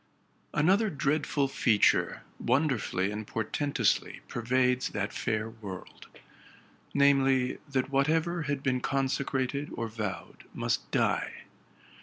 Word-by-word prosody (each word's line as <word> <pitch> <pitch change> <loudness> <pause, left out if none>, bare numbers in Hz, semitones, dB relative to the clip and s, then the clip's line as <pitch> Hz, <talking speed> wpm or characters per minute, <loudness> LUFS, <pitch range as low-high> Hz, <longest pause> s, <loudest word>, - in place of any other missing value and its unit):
Another 190 +8 +4
dreadful 145 -2 0
feature 115 -5 +2 0.2
wonderfully 125 -8 +1
and 105 0 -5
portentously 140 +6 0
pervades 125 +1 +1
that 100 0 -3
fair 110 -2 -1
world; 105 -5 -9 0.8
namely, 135 -2 +3
that 135 0 -1
whatever 160 +5 +2
had 140 -2 -2
been 130 -2 +1
consecrated 135 +1 -1
or 115 - -3
vowed 110 -3 -6
must - - -1
die. - - 0
130 Hz, 100 wpm, -29 LUFS, 115-140 Hz, 0.8 s, Another